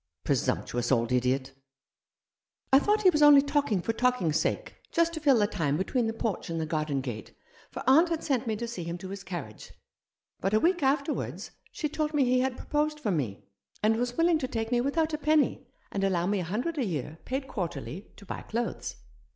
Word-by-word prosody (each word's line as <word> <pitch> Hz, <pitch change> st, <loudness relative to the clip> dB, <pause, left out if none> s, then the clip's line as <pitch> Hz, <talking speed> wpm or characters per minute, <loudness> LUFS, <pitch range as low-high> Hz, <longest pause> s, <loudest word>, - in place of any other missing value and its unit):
" -, -, -60 dB
Presumptuous 120 Hz, +1 st, 0 dB
old 120 Hz, -2 st, +2 dB
idiot! 130 Hz, +2 st, +1 dB, 0.6 s
" -, -, -29 dB
I 270 Hz, -, +9 dB
thought 420 Hz, +6 st, +1 dB
he 370 Hz, -, +7 dB
was 300 Hz, -2 st, +1 dB
only 290 Hz, -2 st, +8 dB
talking 285 Hz, -, 0 dB
for 225 Hz, -, 0 dB
talking' 250 Hz, -7 st, +1 dB
s 155 Hz, -, +2 dB
sake -, -, -2 dB
— -, -, -39 dB
just 335 Hz, 0 st, +2 dB
to 320 Hz, -, -4 dB
fill 285 Hz, -5 st, +4 dB
the 210 Hz, -, +4 dB
time 150 Hz, -7 st, -1 dB
between 230 Hz, +6 st, 0 dB
the -, -, 0 dB
porch 225 Hz, -5 st, -3 dB
and 165 Hz, 0 st, -2 dB
the 160 Hz, -, -1 dB
garden 155 Hz, -3 st, -1 dB
gate, 120 Hz, -5 st, -7 dB, 0.3 s
for -, -, -7 dB
aunt 310 Hz, +7 st, +6 dB
had 330 Hz, -2 st, -2 dB
sent 260 Hz, -4 st, 0 dB
me 220 Hz, -, 0 dB
to 235 Hz, +3 st, -4 dB
see 230 Hz, -7 st, -5 dB
him 170 Hz, +1 st, -4 dB
to 185 Hz, +1 st, -8 dB
his 195 Hz, 0 st, -7 dB
carriage; 170 Hz, -, -7 dB, 0.7 s
but 195 Hz, +3 st, 0 dB
a -, -, +5 dB
week 350 Hz, +6 st, +2 dB
afterwards 280 Hz, +2 st, -1 dB, 0.2 s
she 305 Hz, -, -2 dB
told 305 Hz, +1 st, -2 dB
me 280 Hz, -3 st, +4 dB
he 250 Hz, +1 st, +3 dB
had 260 Hz, 0 st, 0 dB
proposed 300 Hz, 0 st, -1 dB
for 215 Hz, -8 st, -1 dB
me, 125 Hz, -, -2 dB, 0.4 s
and 220 Hz, +1 st, +4 dB
was 245 Hz, +1 st, -2 dB
willing 330 Hz, -1 st, +3 dB
to 260 Hz, -, -2 dB
take 225 Hz, -1 st, -3 dB
me 240 Hz, -1 st, +3 dB
without 310 Hz, +4 st, 0 dB
a 305 Hz, -, -1 dB
penny, 305 Hz, 0 st, +2 dB, 0.2 s
and 195 Hz, -, -2 dB
allow 180 Hz, -3 st, +1 dB
me 200 Hz, +1 st, +1 dB
a 180 Hz, -, -3 dB
hundred 250 Hz, -, -2 dB
a -, -, +2 dB
year, 160 Hz, -, -4 dB
paid 265 Hz, +1 st, -3 dB
quarterly, 180 Hz, -, -5 dB
to 200 Hz, -, -13 dB
buy -, -, -5 dB
clothes. 235 Hz, +2 st, -3 dB
230 Hz, 225 wpm, -28 LUFS, 170-290 Hz, 0.7 s, I